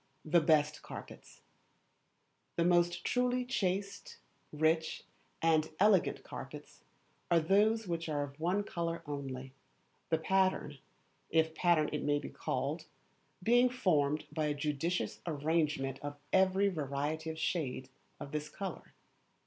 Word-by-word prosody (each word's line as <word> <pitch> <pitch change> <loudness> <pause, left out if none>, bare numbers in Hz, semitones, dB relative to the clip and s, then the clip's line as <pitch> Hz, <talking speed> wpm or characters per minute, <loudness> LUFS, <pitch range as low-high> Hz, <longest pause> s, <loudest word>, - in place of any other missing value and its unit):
The 170 +2 +4
Best 150 -1 +3
Carpets - - -10 1.1
The 170 - +2
most 175 0 +3
truly 250 0 +1
chaste, 200 -5 -2 0.3
rich, 160 +1 +1 0.4
and 160 -1 +3
elegant 200 -2 +4
carpets - - -9 0.5
are 170 - +5
those 210 +6 +3
which 165 -1 -2
are 145 -2 0
of 140 +1 -9
one 180 +5 +1
colour 170 -3 -3
only, 135 -3 -5 0.6
the 160 - +3
pattern, 185 -4 +1 0.5
if 160 0 +2
pattern 165 -2 +3
it 150 - -1
may 145 0 +2
be 145 - -5
called, - - -3 0.6
being 245 +4 +5
formed 155 - +1
by 155 -2 0
a 150 - 0
judicious 150 +4 -2
arrangement 150 -3 0
of 145 0 -5 0.2
every 190 +1 +4
variety 155 0 -2
of 160 - -5
shade 145 -6 -2 0.3
of 140 - -7
this 150 0 -3
colour. 190 +2 -7
160 Hz, 125 wpm, -33 LUFS, 150-185 Hz, 1.1 s, are